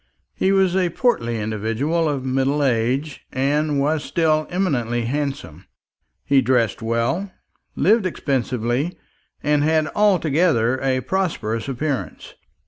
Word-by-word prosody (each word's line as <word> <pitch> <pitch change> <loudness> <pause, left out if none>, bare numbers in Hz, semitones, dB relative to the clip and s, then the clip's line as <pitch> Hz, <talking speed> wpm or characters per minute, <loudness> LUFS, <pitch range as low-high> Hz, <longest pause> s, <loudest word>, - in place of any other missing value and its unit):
He 190 - +1
was 190 -2 +3
a 185 -2 +2
portly 120 - 0
individual 115 +10 -1
of 135 -3 -3
middle 135 +3 +1
age, 130 +4 0
and 145 +2 0
was 150 +2 0
still 155 -2 +1
eminently 120 -11 -1
handsome. 120 - -4 0.6
He 140 -1 +4
dressed 120 -4 +1
well, 115 - -1 0.4
lived 210 -1 +3
expensively, 130 - -1 0.5
and 150 -1 +2
had 155 0 +2
altogether 160 - +2
a 130 -1 +1
prosperous 140 - -2
appearance. 135 +1 -4
140 Hz, 115 wpm, -21 LUFS, 120-160 Hz, 0.6 s, He